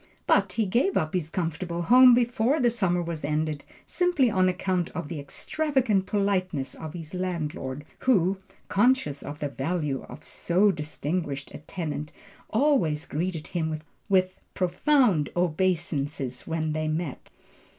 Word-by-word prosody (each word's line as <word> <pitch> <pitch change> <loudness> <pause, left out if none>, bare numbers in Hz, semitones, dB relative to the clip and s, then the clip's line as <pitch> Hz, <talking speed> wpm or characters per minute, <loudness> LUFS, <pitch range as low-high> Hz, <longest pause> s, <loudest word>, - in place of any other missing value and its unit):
But - - +3
he 225 - +1
gave 245 - +2
up 155 0 0
this 175 -4 -2
comfortable 170 0 -2
home 250 +4 +8
before 245 +4 +2
the 240 -3 +3
summer 180 -6 +1
was 165 -2 -5
ended, 150 0 -1 0.2
simply 350 -9 +2
on 185 -2 +3
account 180 -1 -1
of 165 -4 -4
the 160 - -4
extravagant 240 - 0
politeness 185 -8 0
of 160 -1 -8
his 165 -1 -8
landlord, 150 -6 -3
who, 195 -6 +2 0.3
conscious 205 - +2
of 145 +1 -7
the 145 -1 -3
value 140 0 -2
of 155 - -11
so 190 +4 +2
distinguished 150 -2 -3
a - - -7
tenant, 155 -2 -5 0.4
always 215 - +2
greeted 165 0 -3
him 160 -3 -2 0.3
with 185 -1 +3 0.2
"profound 185 - +2
obeisances" 155 -6 -1
when 160 -1 -1
they 155 0 -1
met. 155 -2 -3
175 Hz, 140 wpm, -26 LUFS, 155-200 Hz, 0.4 s, home